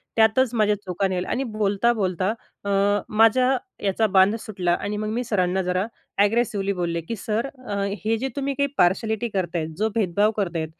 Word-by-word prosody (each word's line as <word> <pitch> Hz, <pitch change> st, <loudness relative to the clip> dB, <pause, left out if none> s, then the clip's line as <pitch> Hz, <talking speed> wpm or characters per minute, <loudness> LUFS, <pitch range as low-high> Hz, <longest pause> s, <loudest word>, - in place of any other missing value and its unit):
त्यातच 225 Hz, +3 st, +3 dB
माझ्या 210 Hz, -2 st, +3 dB
चुका 185 Hz, +1 st, -1 dB
निघाल्या 185 Hz, -1 st, -2 dB
आणि 265 Hz, -, 0 dB
बोलता-बोलता 200 Hz, -3 st, +1 dB, 0.3 s
अ, 200 Hz, -, -4 dB, 0.4 s
माझ्या 250 Hz, +5 st, +4 dB, 0.3 s
याचा 200 Hz, +3 st, +2 dB
बांध 190 Hz, +1 st, +4 dB
सुटला 185 Hz, -5 st, -1 dB
आणि 210 Hz, +1 st, -3 dB
मग 215 Hz, 0 st, -3 dB
मी 245 Hz, +2 st, -1 dB
सरांना 190 Hz, -5 st, 0 dB
जरा 180 Hz, +2 st, 0 dB, 0.4 s
ॲग्रेसिवली 205 Hz, -2 st, +1 dB
बोलले 170 Hz, -2 st, -2 dB
की 195 Hz, +8 st, -5 dB
"सर 220 Hz, +4 st, -2 dB, 0.2 s
अ, 205 Hz, -, -2 dB, 0.3 s
हे 225 Hz, +1 st, +2 dB
जे 260 Hz, +4 st, -2 dB
तुम्ही 280 Hz, 0 st, -1 dB
काही 280 Hz, +1 st, +1 dB
पार्शलिटी 220 Hz, +6 st, +2 dB
करताय, 175 Hz, -5 st, -2 dB
जो 215 Hz, +3 st, +1 dB
भेदभाव 205 Hz, 0 st, +2 dB
करताय 170 Hz, -5 st, -1 dB
205 Hz, 165 wpm, -24 LUFS, 185-225 Hz, 0.4 s, माझ्या